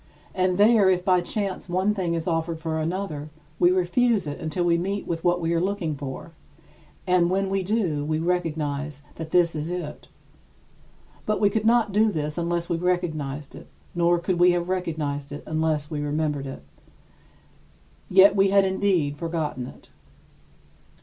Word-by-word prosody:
And 185 -1 +1
there, 210 -1 +5
if 180 -1 +1
by 180 -2 +4
chance 195 0 -3
one 190 +4 +1
thing 180 -4 -1
is 165 -1 -3
offered 165 -1 -1
for 160 -1 -2
another, 155 -3 -3 0.3
we 175 - +5
refuse 185 +3 +2
it 145 -1 -5
until 160 +3 -2
we 170 -1 +3
meet 195 +4 -2
with 165 -1 -3
what 175 0 +2
we 165 0 -1
are 165 - +1
looking 185 -4 -1
for; 140 +2 -7 0.7
and 180 -2 +3
when 195 +1 0
we 195 0 +1
do, 185 -7 0
we 155 +1 -1
recognize 150 -4 -2
that 160 -1 -6
this 170 0 +3
is 155 +1 -4
it. 175 -4 -6 1.2
But 215 0 +1
we 205 -1 +3
could 220 0 -1
not 230 -2 +3
do 215 +3 +3
this 150 -1 -3
unless 170 0 -1
we 170 - -1
recognized 155 -6 -2
it, 75 - -12 0.3
nor 175 0 +3
could 175 +1 -1
we 175 0 +6
have 175 0 -2
recognized 150 -6 -3
it 145 - -7
unless 155 -1 -1
we 150 -1 -2
remembered 145 -1 -1
it. 135 - -8 1.5
Yet 195 +2 +7
we 195 0 +4
had 195 0 +4
indeed 190 -7 +1
forgotten 155 -6 -3
it. - - -15
170 Hz, 170 wpm, -25 LUFS, 155-185 Hz, 1.5 s, Yet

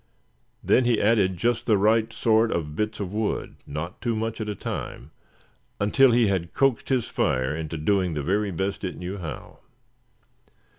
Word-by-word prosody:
Then 125 - +3
he 120 -2 +3
added 100 -4 +2
just 120 +5 0
the 110 -3 +4
right 110 +2 +3
sort 110 0 +2
of 75 -3 -3
bits 105 +3 -2
of 100 -2 -4
wood, 110 0 -2
not 75 +7 -6
too 115 0 -1
much 110 +1 -3
at 105 - -3
a 105 - -3
time, - - -6 0.7
until 130 +7 +4
he 120 0 +4
had 95 -4 -1
coaxed 135 -4 +1
his 130 -4 +1
fire 65 +3 0
into 80 0 -4
doing 90 +1 +1
the 75 - -2
very 100 +6 0
best 95 +3 -3
it 90 - -4
knew 90 +3 -5
how. 85 -3 -8
100 Hz, 170 wpm, -25 LUFS, 90-115 Hz, 0.7 s, the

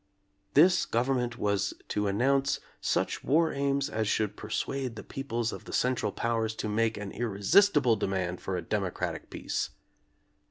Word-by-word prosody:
This 175 +6 +6
government 120 0 0
was 100 -3 0
to 105 0 0
announce 135 +7 +2 0.2
such - - -1
war 160 +3 +3
aims 140 0 0
as 110 -6 -1
should 105 -1 0
persuade 125 +3 -3
the - - -7
peoples 120 -4 -3
of - - -8
the - - -8
Central 125 -1 +1
Powers 115 -1 -1
to 110 - -3
make 110 +1 +1
an 100 -1 -5
irre 115 -4 -3
sistible 145 - +5
demand 90 -2 -1
for 95 -1 -2
a 90 - -4
democratic 100 -4 -3
peace. - - -3
115 Hz, 155 wpm, -29 LUFS, 105-135 Hz, 0.2 s, This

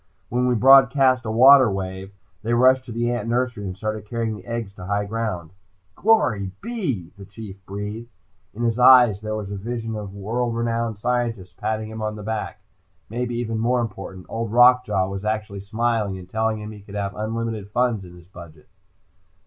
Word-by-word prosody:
When 125 +1 +1
we 125 - +2
broadcast 130 +1 +5
a 110 - -2
water 130 +2 +7
wave, 95 0 -5 0.3
they 115 +2 0
rushed 130 +2 +4
to 120 - -9
the 120 +1 -1
ant 120 -1 -3
nursery 120 -3 -1
and 95 -1 -5
started 110 +1 -4
carrying 110 -3 -3
eggs 115 -4 -4
to 90 - -10
high 100 0 0
ground." 100 -7 -4 0.4
"Glory 125 - +2
be 230 -6 -4 0.2
" - - -37
the 100 - -9
Chief 100 -1 -11
breathed. 105 +4 -6 0.5
In 120 - -4
his 115 0 0
eyes 125 -5 +7
there 110 0 -3
was 105 -2 -5
the 100 - -5
vision 115 +2 -4
of 100 -2 -7
world 115 +4 -2
renowned 115 -1 -1
scientists 115 -5 -2
patting 110 +2 -3
him 110 0 -7
on 105 0 -2
the 105 - -8
back. 110 -1 -4 0.5
Maybe 120 +1 -2
even 115 -2 -2
more 120 +2 +1
important, 95 -5 -6
Old 115 -1 -4
Rock 125 +1 +6
Jaw 95 -1 +1
was 95 +1 -5
actually 105 -2 -3
smiling, 110 -1 -1
and 90 -1 -11
telling 110 +2 -1
him 105 0 -7
he 105 -1 -11
could 100 0 -12
have 100 -1 -2
unlimited 110 -1 -4
funds 120 -2 0
in 90 -1 -12
his 85 0 -16
budget. 85 -5 -14
110 Hz, 190 wpm, -23 LUFS, 100-120 Hz, 0.5 s, water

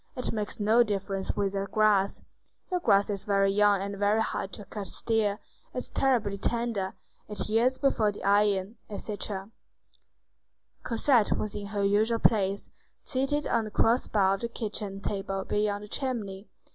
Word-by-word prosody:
It 250 - -2
makes 210 -1 -3
no 220 +3 +4
difference 195 -3 -1
with 200 -1 0
that 195 0 -2
grass. 210 -2 +2 0.5
Your 360 - +1
grass 200 - +3
is 200 0 -5
young 200 0 +3
and 200 0 -5
very 205 +2 +3
hard 195 -3 -2
to 205 - -8
cut 200 -1 -6
still. 215 0 +1 0.4
It's 250 - -4
terribly 225 -7 +1
tender. 230 -4 -1 0.3
It 210 - -4
yields 235 +4 +2
before 225 -7 +2
the 205 - -10
iron." 200 +1 +2
Etc. 205 -1 -4 1.3
Cosette 235 -1 +2
was 210 - -3
in 205 -1 -5
her 200 -1 -2
usual 215 +3 +3
place, 200 -3 +1 0.3
seated 290 +2 0
on 225 - +1
the 215 - -5
cross 230 +4 +2
bar 195 -2 +3
of 195 - -2
the 235 - -1
kitchen 210 -4 -3
table 195 -1 -3
near 210 -1 0
the 210 - -10
chimney. 210 -6 -3
210 Hz, 160 wpm, -28 LUFS, 200-225 Hz, 1.3 s, no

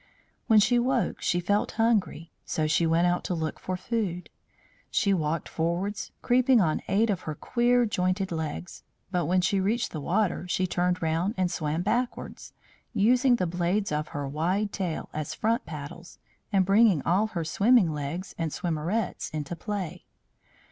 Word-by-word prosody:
When 220 -1 +6
she 240 +4 +4
woke 245 -5 0
she 175 - +1
felt 205 +4 0
hungry; 220 -7 0
so 155 - -1
she 155 +2 +2
went 165 +2 +3
out 175 0 +1
to 180 - -1
look 160 -1 -3
for 185 0 -3
food. 185 -4 -3 0.6
She 200 -4 +2
walked 160 -2 -1
forwards, 175 +5 -2
creeping 250 0 +4
on 160 -6 +1
eight 210 +3 +2
of 190 - -2
her 155 - -3
queer 245 - +2
jointed 185 -2 -1
legs; 160 +1 -5 0.3
but 175 -5 0
when 180 +1 +3
she 190 +2 +1
reached 220 +5 0
the 155 - -5
water 180 +1 0
she 185 +1 0
turned 180 0 0
round 165 +7 0
and 185 -2 +1
swam 155 +2 -2
backwards, 240 +5 -2 0.4
using 245 +4 +4
the 185 - 0
blades 180 +3 -1
of 150 0 -1
her 145 -1 -4
wide 180 +9 -1
tail 180 -5 -3
as 155 -1 -4
front 230 +3 0
paddles, 155 +3 -8 0.3
and 190 -2 +3
bringing 200 -4 +4
all 195 +6 +2
her 170 -6 -4
swimming 200 0 +4
legs 150 +6 -5
and 165 -2 -1
swimmerets 175 +7 -2
into 155 +1 -4
play. 195 -2 -5
180 Hz, 165 wpm, -27 LUFS, 165-210 Hz, 0.6 s, When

